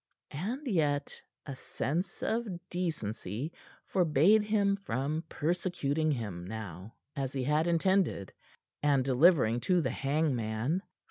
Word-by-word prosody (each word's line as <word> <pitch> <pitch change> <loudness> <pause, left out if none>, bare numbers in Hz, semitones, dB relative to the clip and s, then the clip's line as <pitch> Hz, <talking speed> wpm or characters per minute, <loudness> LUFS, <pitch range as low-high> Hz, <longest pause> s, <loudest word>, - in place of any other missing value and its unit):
And 225 - -3
yet 150 - 0 0.2
a 140 - -6
sense 170 +7 -3
of 230 +1 0 0.2
decency 135 - -3 0.3
forbade 180 +4 +4
him 205 -1 +2
from 155 - -2
persecuting 160 -2 0
him 105 -9 -4
now, 100 0 -7 0.2
as 135 -2 -2
he 135 -2 -1
had 150 +5 +2
intended, 170 - +1 0.5
and 140 -3 +3
delivering 130 -4 +4
to 180 +8 +2
the 165 - 0
hangman. 135 - 0
150 Hz, 115 wpm, -31 LUFS, 125-180 Hz, 0.5 s, forbade